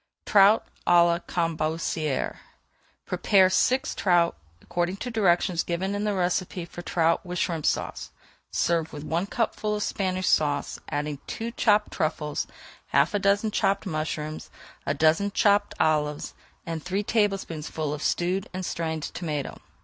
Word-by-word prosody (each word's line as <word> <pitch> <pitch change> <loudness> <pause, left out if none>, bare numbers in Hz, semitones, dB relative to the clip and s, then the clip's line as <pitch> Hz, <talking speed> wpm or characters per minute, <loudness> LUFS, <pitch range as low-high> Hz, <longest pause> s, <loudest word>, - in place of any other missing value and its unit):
TROUT 205 +2 +6 0.2
À 175 -1 +7
LA 170 0 +2
CAMBACERES 160 -3 -1 0.7
Prepare 185 +1 +4
six 260 +7 +2
trout 175 -3 +2 0.2
according 175 - -2
to 245 +4 -5
directions 180 -5 +2
given 185 +3 -2
in 205 +1 -2
the 210 -1 0
recipe 180 -1 -1
for 175 0 -9
Trout 165 -1 +1
with 180 -1 -5
Shrimp 165 -3 -1
Sauce. - - -2 0.4
Serve 165 -2 0
with 145 -1 -7
one 170 +5 -1
cupful 215 -1 -1
of 210 - -1
Spanish 185 -1 -1
Sauce, 145 -2 +1
adding 145 -1 -3
two 230 +1 -4
chopped 210 -2 +2
truffles, 155 -1 -2 0.4
half - - +2
a 205 - +1
dozen 200 +2 +2
chopped 200 0 +1
mushrooms, 155 -2 -4 0.4
a 145 - +1
dozen 160 +7 +3
chopped 205 0 +2
olives, 150 -1 +1 0.3
and 165 -1 -4
three 190 +4 -2
tablespoonfuls 170 -8 -1
of 150 - -5
stewed 180 +4 0
and 185 0 -3
strained 160 -2 -3
tomato. 150 -6 -4
175 Hz, 140 wpm, -26 LUFS, 160-200 Hz, 0.7 s, À